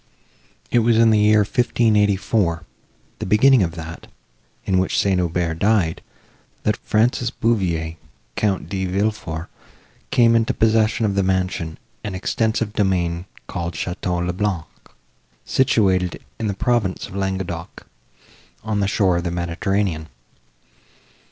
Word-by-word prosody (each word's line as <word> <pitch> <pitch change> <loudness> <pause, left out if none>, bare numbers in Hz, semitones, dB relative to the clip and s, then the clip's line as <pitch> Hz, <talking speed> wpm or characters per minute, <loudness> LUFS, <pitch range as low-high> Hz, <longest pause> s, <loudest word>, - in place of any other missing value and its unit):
It 120 - +4
was 115 0 +3
in 115 0 +5
the 110 - +4
year 105 0 +5
1584, 105 -5 +1 0.6
the - - -3
beginning 125 +5 +5
of 85 -3 0
that, 85 0 -8 0.6
in 95 -1 +2
which 95 - 0
St. 95 -2 +2
Aubert 85 -1 -1
died, 100 -5 +2 0.6
that - - +1
Francis 120 +2 +1
Beauveau, 90 -10 0 0.4
Count 100 -3 0
De 95 -2 -2
Villefort, 90 -4 -2 0.6
came 115 -1 +4
into 115 +3 +1
possession 110 0 +2
of 100 - +1
the 100 - +2
mansion 95 -3 -1 0.3
and 105 -4 -4
extensive 110 +2 -1
domain 90 -4 0 0.2
called 85 -1 -4
Château 90 0 -2
le 90 - -1
Blanc, 95 -4 -1 0.8
situated 95 -8 +2 0.2
in 110 - -1
the 100 - -2
province 110 -4 0
of - - -11
Languedoc, 95 -3 -4 0.8
on 110 -1 -1
the 100 - +1
shore 95 -3 +2
of 85 - -2
the 85 - -1
Mediterranean. 85 -1 -1
95 Hz, 130 wpm, -21 LUFS, 90-110 Hz, 0.8 s, in